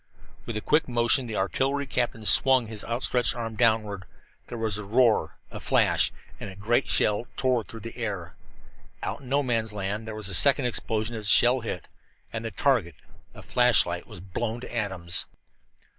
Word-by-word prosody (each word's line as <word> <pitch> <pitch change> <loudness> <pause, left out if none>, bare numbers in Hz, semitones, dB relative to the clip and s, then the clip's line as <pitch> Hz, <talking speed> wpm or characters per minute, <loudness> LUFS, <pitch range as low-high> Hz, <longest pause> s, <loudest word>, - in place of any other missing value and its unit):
With 115 - -4
a - - -3
quick 150 +7 +1
motion 120 +1 +1
the 110 - -5
artillery 135 +9 -1
captain 120 -4 -2
swung 130 +2 +6
his 110 -1 -7
outstretched 120 0 0
arm 115 -2 -5
downward. 110 -4 0 0.4
There 120 - -7
was 110 -2 -2
a - - -6
roar, 115 +2 +1
a - - -7
flash, - - +2 0.3
and 105 - -7
a 95 - -11
great 110 +4 0
shell 105 +3 +2
tore 130 -3 +1
through 115 +1 -11
the 115 +2 -9
air. 100 -8 -5 0.7
Out - - -3
in 130 - -12
No 140 +2 +1
Man's 115 -4 -1
Land 105 +2 -4
there 110 - -6
was 110 -3 -5
a 100 - -3
second 140 - +5
explosion 115 -1 -2
as 110 -1 -5
the - - +6
shell 125 +4 +5
hit, 110 -8 -6 0.5
and 115 0 -4
the 115 - -4
target 115 - 0 0.4
a - - -12
flashlight 110 -8 +2
was 85 - -11
blown 110 +5 -4
to 120 - -8
atoms. 95 -6 -1
115 Hz, 185 wpm, -26 LUFS, 105-125 Hz, 0.7 s, swung